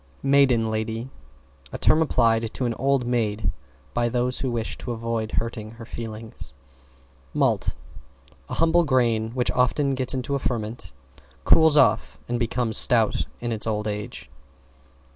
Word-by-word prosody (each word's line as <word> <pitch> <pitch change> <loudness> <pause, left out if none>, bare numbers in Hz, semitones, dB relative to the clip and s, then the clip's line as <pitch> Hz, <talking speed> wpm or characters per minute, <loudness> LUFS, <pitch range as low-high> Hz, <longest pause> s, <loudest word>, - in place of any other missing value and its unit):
=MAIDEN 135 -5 +3
LADY= 110 +3 -3 0.6
A - - -5
term 160 - +4
applied 115 -6 +2
to 130 - -2
an 120 - 0
old 135 -1 +1
maid 110 -6 0 0.4
by 120 0 +1
those 125 +1 0
who 130 - -2
wish 115 -2 -3
to 120 - -4
avoid 115 -1 -3
hurting 110 -1 -3
her 115 0 -11
feelings. 110 - -8 0.8
=MALT= - - +1 0.7
A - - -3
humble 165 +1 +3
grain 120 -6 +1
which 125 -1 +1
often 135 +3 +1
gets 130 0 0
into 130 +2 -3
a 140 - 0
ferment, 110 - -4 0.5
cools 160 - +5
off - - +3
and 120 0 -2
becomes 120 -1 0
Stout 115 -3 +4
in 120 0 -2
its 110 -1 -2
old 105 -1 -1
age. 105 - -6
120 Hz, 145 wpm, -24 LUFS, 110-130 Hz, 0.8 s, cools